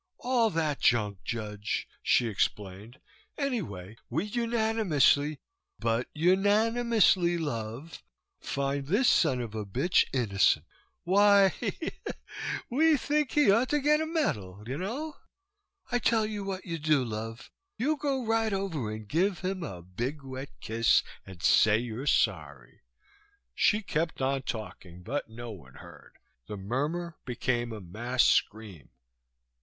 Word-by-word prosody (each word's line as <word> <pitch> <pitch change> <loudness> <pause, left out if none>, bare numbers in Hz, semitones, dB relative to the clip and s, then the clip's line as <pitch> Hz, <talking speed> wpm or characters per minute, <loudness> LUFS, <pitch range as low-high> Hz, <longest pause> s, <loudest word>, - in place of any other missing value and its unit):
"All 245 -3 +2
that 160 -6 -1
junk, 105 -5 +1
Judge," 105 -3 -3
she 120 - +3
explained, 105 +3 -3 0.4
"anyway, 130 - -3
we 160 +10 -1
unanimously 220 - +2 0.4
but 115 +1 0
unanimously, 205 +1 +3
love! 130 0 -5 0.4
find 140 0 -2
this 215 - +2
son 150 - +3
of 115 -3 -6
a 110 -1 -3
bitch 135 - +2
innocent. 100 -7 +2 0.4
Why," 200 +1 +5
she 225 - -3
giggled, 320 - -6 0.6
"we 310 +4 +4
think 295 +1 0
he 295 -8 +5
ought 230 +5 +3
to 295 - +2
get 300 +2 +3
a 315 - -2
medal, 105 - -2
you 130 +5 -4
know? 275 - -4 0.7
I 245 - +2
tell 225 -2 +2
you 210 -1 -4
what 195 -1 -5
you 165 -3 -4
do, 150 -3 +2
love, 115 +1 -6 0.3
you 300 +6 +1
go 275 -3 -1
right 225 -1 +1
over 175 - -2
and 110 -1 -7
give 180 - 0
him 185 0 -2
a 90 - -6
big 120 - -4
wet 135 +1 -7
kiss 115 +1 +3 0.2
and 95 -2 -11
say 110 -1 +5
you're 120 +4 -5
sorry." 70 - 0 0.7
She 210 - +2
kept 165 -2 -2
on 135 0 0
talking, 95 -7 -7
but 135 +3 -3
no 120 +1 -8
one 70 -11 -13
heard. - - -14 0.3
The 105 - -6
murmur 150 - -3
became 120 -1 -2
a 110 - -6
mass 120 +8 0
scream. 105 - 0
145 Hz, 140 wpm, -29 LUFS, -, 0.7 s, Why